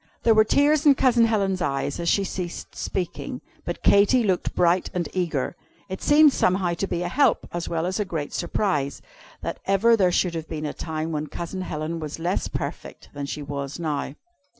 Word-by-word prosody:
There 230 Hz, -, +5 dB
were 215 Hz, 0 st, +6 dB
tears 290 Hz, +6 st, +3 dB
in 280 Hz, -, +8 dB
Cousin 245 Hz, -3 st, +4 dB
Helen's 195 Hz, -4 st, 0 dB
eyes 140 Hz, -2 st, -1 dB
as 170 Hz, 0 st, 0 dB
she 200 Hz, -, +3 dB
ceased 180 Hz, -2 st, -5 dB
speaking. 180 Hz, -3 st, -4 dB, 0.3 s
But -, -, -5 dB
Katy 205 Hz, +5 st, +5 dB
looked 190 Hz, -4 st, 0 dB
bright 175 Hz, +1 st, +2 dB
and 175 Hz, -1 st, -1 dB
eager. 170 Hz, -5 st, -1 dB, 0.3 s
It 190 Hz, -, -5 dB
seemed 295 Hz, -1 st, +6 dB
somehow 185 Hz, -1 st, +1 dB
to 195 Hz, +3 st, -2 dB
be 175 Hz, -, -2 dB
a -, -, -1 dB
help, 260 Hz, +6 st, +2 dB
as 175 Hz, -1 st, -3 dB
well 165 Hz, 0 st, -1 dB
as 185 Hz, +3 st, -2 dB
a -, -, +2 dB
great 160 Hz, -6 st, -4 dB
surprise, 160 Hz, -6 st, -1 dB, 0.4 s
that -, -, -4 dB
ever 205 Hz, +4 st, +4 dB
there 185 Hz, -5 st, +3 dB
should 175 Hz, 0 st, +1 dB
have 165 Hz, -1 st, -5 dB
been 155 Hz, -1 st, -4 dB
a 150 Hz, -, -3 dB
time 160 Hz, 0 st, -4 dB
when 150 Hz, -1 st, -2 dB
Cousin 170 Hz, +5 st, -5 dB
Helen 160 Hz, -1 st, -4 dB
was 155 Hz, -2 st, -5 dB
less 175 Hz, +3 st, -1 dB
perfect -, -, -6 dB
than 140 Hz, -1 st, -5 dB
she 150 Hz, -, -5 dB
was 140 Hz, -1 st, -5 dB
now. 150 Hz, -4 st, -3 dB
175 Hz, 195 wpm, -24 LUFS, 155-200 Hz, 0.4 s, in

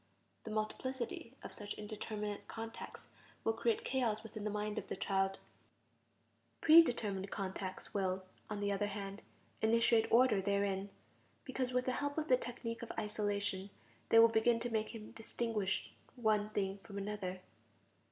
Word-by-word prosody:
The -, -, -5 dB
multiplicity 235 Hz, +3 st, -3 dB
of -, -, -7 dB
such 205 Hz, -1 st, -6 dB
indeterminate 210 Hz, -1 st, -5 dB
contacts 225 Hz, 0 st, -7 dB, 0.4 s
will 225 Hz, -, +2 dB
create 230 Hz, 0 st, 0 dB
chaos 230 Hz, -5 st, 0 dB
within 215 Hz, -1 st, -7 dB
the 210 Hz, -, 0 dB
mind 210 Hz, +1 st, -2 dB
of -, -, -9 dB
the -, -, -3 dB
child; 195 Hz, 0 st, +1 dB, 1.2 s
pre 325 Hz, +1 st, +10 dB
determined 205 Hz, -, -1 dB
contacts 190 Hz, -2 st, -4 dB
will, 190 Hz, -1 st, 0 dB, 0.3 s
on 210 Hz, -1 st, -3 dB
the 200 Hz, 0 st, +1 dB
other 200 Hz, +1 st, +1 dB
hand, 200 Hz, 0 st, -5 dB, 0.4 s
initiate 230 Hz, 0 st, +4 dB
order 230 Hz, -4 st, +6 dB
therein, 200 Hz, 0 st, 0 dB, 0.6 s
because 260 Hz, -1 st, -1 dB
with 250 Hz, 0 st, +1 dB
the 255 Hz, -, +1 dB
help 285 Hz, +3 st, -2 dB
of 310 Hz, -1 st, -1 dB
the 255 Hz, -, +7 dB
technique 230 Hz, -1 st, -5 dB
of 235 Hz, -, -5 dB
isolation, 205 Hz, -2 st, -1 dB, 0.4 s
they 225 Hz, -, +6 dB
will 230 Hz, 0 st, +10 dB
begin 230 Hz, +1 st, +3 dB
to 240 Hz, 0 st, -2 dB
make 220 Hz, -1 st, 0 dB
him 215 Hz, -1 st, -8 dB
distinguish 225 Hz, -4 st, -1 dB, 0.2 s
one 215 Hz, -4 st, +2 dB
thing 200 Hz, -2 st, -1 dB
from 200 Hz, +1 st, -9 dB
another. 195 Hz, -2 st, -3 dB
215 Hz, 150 wpm, -36 LUFS, 200-230 Hz, 1.2 s, pre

